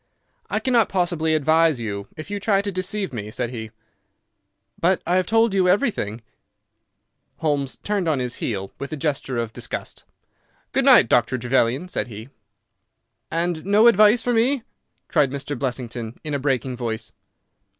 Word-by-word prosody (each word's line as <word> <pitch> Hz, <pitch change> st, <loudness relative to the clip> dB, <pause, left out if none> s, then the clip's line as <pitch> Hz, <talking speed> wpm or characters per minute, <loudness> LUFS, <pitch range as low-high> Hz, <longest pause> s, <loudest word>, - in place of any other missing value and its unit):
"I -, -, 0 dB
cannot 240 Hz, -4 st, +2 dB
possibly 170 Hz, -4 st, +1 dB
advise 155 Hz, -1 st, +3 dB
you 100 Hz, -3 st, -4 dB
if 155 Hz, +6 st, -8 dB
you 205 Hz, -, -2 dB
try 200 Hz, -1 st, +2 dB
to 200 Hz, -, -2 dB
deceive 190 Hz, -1 st, -3 dB
me," 105 Hz, -3 st, -5 dB
said 120 Hz, +1 st, -3 dB
he. 110 Hz, -3 st, -6 dB, 1.1 s
"But 185 Hz, +2 st, +3 dB
I 180 Hz, -, +1 dB
have 185 Hz, -1 st, +2 dB
told 225 Hz, -1 st, +3 dB
you 185 Hz, -2 st, +3 dB
everything." 180 Hz, -, 0 dB, 1.2 s
Holmes 145 Hz, -4 st, -1 dB
turned 205 Hz, -4 st, -1 dB
on 155 Hz, -3 st, +2 dB
his 125 Hz, -1 st, -3 dB
heel 100 Hz, -4 st, -3 dB
with 140 Hz, -, -6 dB
a 155 Hz, -, -3 dB
gesture 135 Hz, -3 st, -2 dB
of 115 Hz, -1 st, -3 dB
disgust. -, -, -6 dB, 0.7 s
"Good -, -, +1 dB
night, -, -, +7 dB
Dr. 120 Hz, +1 st, +2 dB
Trevelyan," 125 Hz, +5 st, +1 dB
said 180 Hz, -, -3 dB
he. 110 Hz, +2 st, -9 dB, 1.0 s
"And 165 Hz, 0 st, -1 dB
no 205 Hz, +3 st, +4 dB
advice 215 Hz, +1 st, +6 dB
for 245 Hz, -, +1 dB
me?" 240 Hz, +3 st, +2 dB, 0.4 s
cried 150 Hz, -4 st, +2 dB
Blessington, 125 Hz, -4 st, -4 dB
in 150 Hz, -, -4 dB
a 140 Hz, -, 0 dB
breaking 130 Hz, -2 st, -1 dB
voice. 115 Hz, -2 st, -4 dB
150 Hz, 155 wpm, -23 LUFS, 125-190 Hz, 1.2 s, night